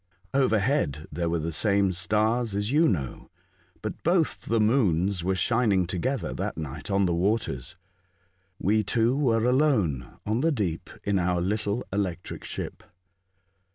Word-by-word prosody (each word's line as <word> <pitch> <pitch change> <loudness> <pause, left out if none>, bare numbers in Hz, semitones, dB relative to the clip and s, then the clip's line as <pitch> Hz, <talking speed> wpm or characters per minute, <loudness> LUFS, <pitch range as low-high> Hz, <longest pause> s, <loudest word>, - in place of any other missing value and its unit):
Overhead 110 - +1
there 85 +2 -1
were 85 - +1
the 80 +1 -3
same 100 +2 +2
stars 110 +5 +1
as 105 +3 -1
you 160 +3 +4
know, 70 - -2 0.5
but - - -5
both 170 -1 +1
the 115 0 +2
moons 100 - +2
were 95 +1 +1
shining 105 -3 +2
together 110 +10 -2
that - - -3
night 80 +6 -6
on 100 0 +2
the 85 - +1
waters. 90 - -1 0.8
We 110 +4 +2
two 115 +4 +1
were 120 -6 +2
alone 120 - +1
on 110 +4 0
the 165 +2 +3
deep 95 - -2
in 100 -1 +1
our 90 0 +1
little 105 +5 -1
electric 90 -3 -3
ship. - - -5
100 Hz, 145 wpm, -26 LUFS, 90-115 Hz, 0.8 s, you